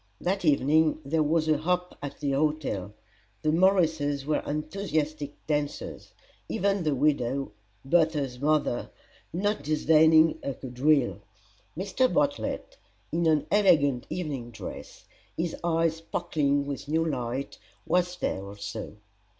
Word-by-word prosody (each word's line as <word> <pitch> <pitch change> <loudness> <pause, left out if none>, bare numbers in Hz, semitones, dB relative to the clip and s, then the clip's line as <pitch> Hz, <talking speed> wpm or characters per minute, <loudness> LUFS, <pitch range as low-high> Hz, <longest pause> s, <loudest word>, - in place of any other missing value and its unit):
That 190 +2 -1
evening 155 +1 +3
there 155 +3 +1
was 155 +1 +2
a 155 -2 +3
hop 180 +2 -1
at 140 0 -6
the 140 - -1
hotel. 140 -9 -1 0.5
The 155 - +2
Morrises 160 -6 +2
were 150 0 +1
enthusiastic 155 -2 -2
dancers 150 -1 -3 0.4
even 200 0 +1
the 155 -4 +1
widow, 135 -2 +1 0.3
Bertha's 150 -5 +1
mother, 145 -3 +1 0.4
not 205 +3 -1
disdaining 155 +1 +4
a 140 - -3
quadrille. 130 -3 +1 0.6
Mr. 200 +8 +1
Bartlett, 290 - -1 0.3
in 170 0 +1
an 155 -2 +3
elegant 155 -11 +3
evening 145 -9 -4
dress, 115 - -9 0.3
his 165 0 -1
eyes 165 -1 +1
sparkling 145 -3 0
with 140 0 -5
new 160 +2 +1
light, 130 -2 -3 0.3
was 180 0 +1
there 95 - -2
also. 100 +2 -7
155 Hz, 120 wpm, -27 LUFS, 140-165 Hz, 0.6 s, disdaining